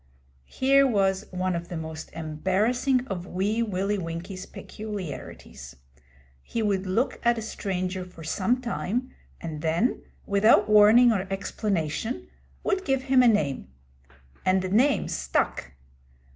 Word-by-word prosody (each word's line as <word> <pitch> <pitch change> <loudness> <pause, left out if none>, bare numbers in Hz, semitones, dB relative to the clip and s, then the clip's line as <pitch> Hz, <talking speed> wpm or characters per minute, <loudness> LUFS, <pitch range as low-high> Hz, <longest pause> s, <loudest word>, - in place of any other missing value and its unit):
Here 275 +1 +4
was 195 -3 +1
one 185 0 -1
of 170 0 -4
the 175 - -5
most 160 0 -7
embarrassing 200 - 0
of 185 -5 -5
Wee 205 +5 -1
Willie 200 -1 -1
Winkie's 170 +2 -6
peculiarities. 185 - -8 0.7
He 230 - -3
would 195 -2 0
look 225 +8 0
at 235 0 +3
a - - -3
stranger 185 -3 -3
for 180 -2 -12
some 220 +10 0
time, 245 +1 -3 0.3
and 155 -3 -6
then, 165 +10 0 0.2
without 200 +3 +4
warning 215 +3 +7
or 195 -3 -1
explanation, 195 - -2 0.4
would 390 -2 0
give 270 -4 0
him 265 -1 +4
a 250 - +5
name. 150 - +1 0.8
And 185 0 +2
the 185 - -2
name 255 +8 +3
stuck. - - -1
195 Hz, 130 wpm, -26 LUFS, 180-235 Hz, 0.8 s, warning